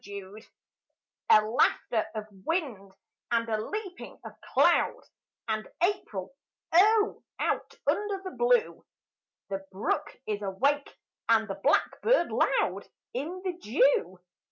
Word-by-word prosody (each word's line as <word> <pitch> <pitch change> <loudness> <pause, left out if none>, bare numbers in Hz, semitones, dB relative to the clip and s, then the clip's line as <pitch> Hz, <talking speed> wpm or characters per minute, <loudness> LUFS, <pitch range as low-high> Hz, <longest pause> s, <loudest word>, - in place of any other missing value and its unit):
APRIL 200 0 -9 0.9
A 215 0 +7
laughter 220 0 +1
of 215 -1 -4 0.2
wind 250 - -2 0.4
and 230 -1 +1
a 215 -1 -1
leaping 390 - -6
of - - -7 0.2
cloud, - - +3 0.5
And 215 -1 -2 0.2
April, 275 - -1 0.4
oh, 425 +4 +4 0.2
out - - -1
under 415 -1 0
the 375 - -5
blue! 485 -1 +2 0.7
The 195 0 -3
brook 195 +2 -2
is 210 -1 -3
awake 275 +9 0 0.4
and 220 -1 +4
the 195 - -3
blackbird 440 - +2
loud - - +1 0.3
In 335 +8 -4
the 370 - 0
dew! 370 - +2
250 Hz, 115 wpm, -28 LUFS, -, 0.9 s, A